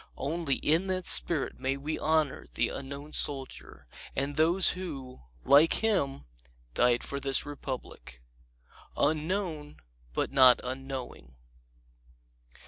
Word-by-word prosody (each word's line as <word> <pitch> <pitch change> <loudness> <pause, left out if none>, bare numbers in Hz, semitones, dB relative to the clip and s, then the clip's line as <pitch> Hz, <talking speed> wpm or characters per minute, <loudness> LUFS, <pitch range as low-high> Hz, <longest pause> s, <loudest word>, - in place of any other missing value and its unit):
Only 145 0 -2
in 165 +5 0
that 185 -1 -2
spirit 155 -6 +2
may 135 +1 -1
we 150 +3 -4
honor 155 -3 0
the - - +1
Unknown 140 +2 -8
Soldier 135 -2 -2 0.3
and 140 +1 -2
those 170 +4 +5
who, 140 -9 -8 0.2
like 150 +4 +5
him, 145 -12 0 0.5
died 120 - +2
for 140 - -4
this 135 -1 +1
Republic. 130 - -8 0.8
Unknown, 155 0 -2 0.3
but - - -2
not 130 -2 +7
unknowing! 130 - -7
140 Hz, 110 wpm, -29 LUFS, 135-160 Hz, 0.8 s, not